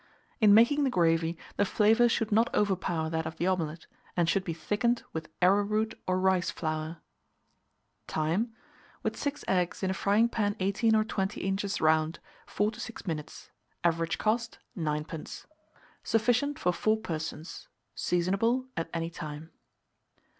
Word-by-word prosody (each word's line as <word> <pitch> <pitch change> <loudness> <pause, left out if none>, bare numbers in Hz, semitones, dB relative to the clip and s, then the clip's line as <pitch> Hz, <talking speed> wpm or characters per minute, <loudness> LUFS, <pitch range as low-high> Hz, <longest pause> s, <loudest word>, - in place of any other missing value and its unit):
In 210 -3 +7
making 260 +7 +5
the 270 - +2
gravy, 165 -4 +2 0.2
the - - +4
flavour 220 +4 +4
should 225 -1 0
not 225 +3 +3
overpower 185 -5 0
that 160 -1 -1
of 160 - -7
the 175 - -1
omelet, 165 -3 -1 0.3
and 170 -2 +3
should 190 +2 +2
be 175 - -3
thickened 210 +9 0
with 160 -1 -5
arrowroot 205 +3 +3
or 185 0 +1
rice 185 -1 +2
flour. 155 0 -3 1.1
Time. 170 +10 0 0.5
With - - -1
6 285 0 -3
eggs, 180 0 0
in 190 - +1
a - - 0
frying 205 +4 +3
pan 205 -3 0
18 210 +4 +2
or 215 - +4
20 200 -2 -2
inches 195 +1 -1
round, 160 +1 +2 0.3
4 210 +1 0
to 225 - -12
6 235 -2 -7
minutes. 155 -5 -6 0.3
Average 165 -1 +1
cost, 225 +2 0 0.2
9d. 155 -2 -4 0.6
Sufficient 245 +6 +1
for 180 - +1
4 215 +4 +2
persons. 160 -4 -6 0.3
Seasonable 195 +9 +1
at 165 0 -3
any 165 0 -2
time. 155 0 -7
190 Hz, 145 wpm, -29 LUFS, 165-220 Hz, 1.1 s, In